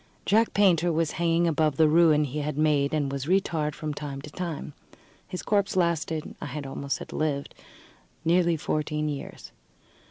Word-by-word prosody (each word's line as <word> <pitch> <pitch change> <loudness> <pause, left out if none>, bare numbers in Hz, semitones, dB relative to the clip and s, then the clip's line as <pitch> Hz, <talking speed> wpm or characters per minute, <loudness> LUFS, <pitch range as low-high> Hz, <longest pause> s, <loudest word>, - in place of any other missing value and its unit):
Jack 220 +3 +3
Painter 175 -4 +4
was 165 -1 0
hanging 170 0 +3
above 155 -3 +1
the 160 - +5
ruin 155 -1 +5
he 145 +1 -3
had 150 0 -3
made, 150 -2 +2
and 145 -3 0
was 140 0 -4
re 190 +3 +5
tarred 155 -5 -3
from 155 -1 -4
time 145 -2 -6
to 150 - -9
time. 165 -4 -5 0.5
His 180 - -6
corpse 200 -2 +1
lasted 165 -3 0
I - - -4
had 145 -1 -5
almost 140 +1 -3
said - - -8
lived 145 -2 -2 0.7
nearly 170 0 +3
fourteen 150 0 -1
years. 145 -2 -7
155 Hz, 170 wpm, -26 LUFS, 150-170 Hz, 0.7 s, the